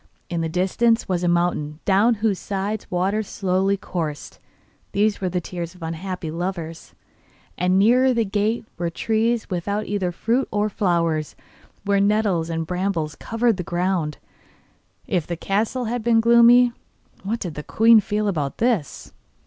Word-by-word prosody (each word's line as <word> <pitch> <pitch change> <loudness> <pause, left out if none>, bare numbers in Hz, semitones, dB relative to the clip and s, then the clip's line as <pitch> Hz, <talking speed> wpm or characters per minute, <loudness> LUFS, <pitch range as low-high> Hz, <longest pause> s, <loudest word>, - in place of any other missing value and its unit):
In 170 -1 -1
the 165 - -1
distance 210 +7 +1
was 180 -2 -1
a - - +1
mountain 170 -3 0
down 205 +5 +4
whose 210 -2 0
sides 200 +2 -4
waters 195 +4 0
slowly 195 +1 0
coursed 160 -6 -5 0.5
these 205 0 +1
were 185 - 0
the 180 0 -1
tears 175 0 -6
of 180 - -12
unhappy 165 0 -4
lovers 170 -1 -5 0.6
and 180 +1 +1
nearer 250 +6 +4
the 230 -2 +1
gate 210 +3 -1
were 170 -1 -1
trees 225 +5 0
without 200 +4 -2
either 195 -3 -1
fruit 235 +9 0
of 210 0 0
flowers, 170 -5 0 0.5
while 200 0 +2
nettles 200 -5 +1
and 165 0 -2
brambles 180 -3 -2
covered 230 +5 0
the 180 - -3
ground. 175 -3 -1 0.9
If 175 -5 -1
the 170 - -3
castle 220 +8 -1
had 240 +2 -2
been 230 0 +4
gloomy, 235 +1 +6 0.5
what 220 +5 -3
did 175 -7 -5
the 150 - -6
queen 225 +7 +5
feel 210 0 -1
about 150 -8 -2
this? 225 - -1
195 Hz, 155 wpm, -22 LUFS, 175-220 Hz, 0.9 s, gloomy